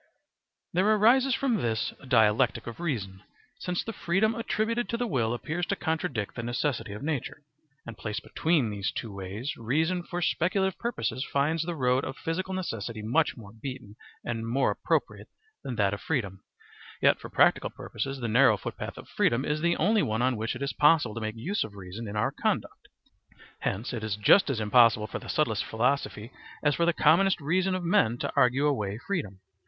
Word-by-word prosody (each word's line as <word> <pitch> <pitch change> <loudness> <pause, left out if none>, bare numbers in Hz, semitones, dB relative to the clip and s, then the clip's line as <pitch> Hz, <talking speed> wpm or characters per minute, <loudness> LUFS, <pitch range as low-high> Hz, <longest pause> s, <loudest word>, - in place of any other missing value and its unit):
There 200 +5 +4
arises 255 +5 +4
from 265 -4 +1
this 115 - -1
a 140 - -14
dialectic 115 0 +3
of 120 +4 -8
reason, 105 - -3 0.4
since 180 -1 -2
the 225 - -5
freedom 200 +6 +1
attributed 230 +1 -1
to 235 - -1
the 245 - -1
will 125 - 0
appears 160 +8 -3
to - - 0
contradict 160 - -2
the 115 - -5
necessity 120 -2 -2
of 105 - -8
nature, 145 -1 -3 0.4
and 115 - -8
placed 105 +3 -4
between 155 -9 +1
these 100 -2 -2
two 110 -3 -6
ways 100 +8 -5
reason 160 +10 0
for 175 0 -5
speculative 185 +2 0
purposes 235 - -2
finds 150 +3 +1
the 170 +1 -3
road 125 -2 +2
of 130 - -5
physical 185 +3 -3
necessity 115 - -4
much 140 +9 +1
more 105 -3 -11
beaten 115 -2 -8 0.3
and 115 -1 -3
more 130 +4 +2
appropriate - - -1 0.4
than 130 - -4
that 100 -2 +2
of 100 - -5
freedom; 100 - -2 0.6
yet - - +4
for - - -9
practical - - +3
purposes 135 +5 -5
the 120 - -2
narrow 125 +5 +5
footpath - - -6
of - - -10
freedom 120 +3 +1
is 150 +1 -1
the 170 +1 +2
only 210 +5 +3
one 110 - 0
on 130 0 +2
which 110 +3 -3
it 130 - -5
is 140 - -2
possible 150 -7 +4
to 115 - -5
make 110 0 -3
use 170 - -1
of 105 -2 -9
reason 100 +4 -7
in 100 - -6
our 105 - +1
conduct; - - -2 0.7
hence 105 +7 -3
it 115 -3 -4
is 110 -2 -1
just 105 - +5
as 130 -5 -1
impossible 110 0 +5
for - - -5
the - - -11
subtlest 115 -8 +1
philosophy 120 -1 -1 0.3
as 145 -1 +3
for 170 +2 +1
the - - +5
commonest 175 +4 +4
reason 185 +5 +1
of 185 - -3
men 120 -9 +2
to - - -3
argue 130 +4 +3
away 105 -9 0
freedom. 125 - -3
130 Hz, 190 wpm, -28 LUFS, 110-170 Hz, 0.7 s, narrow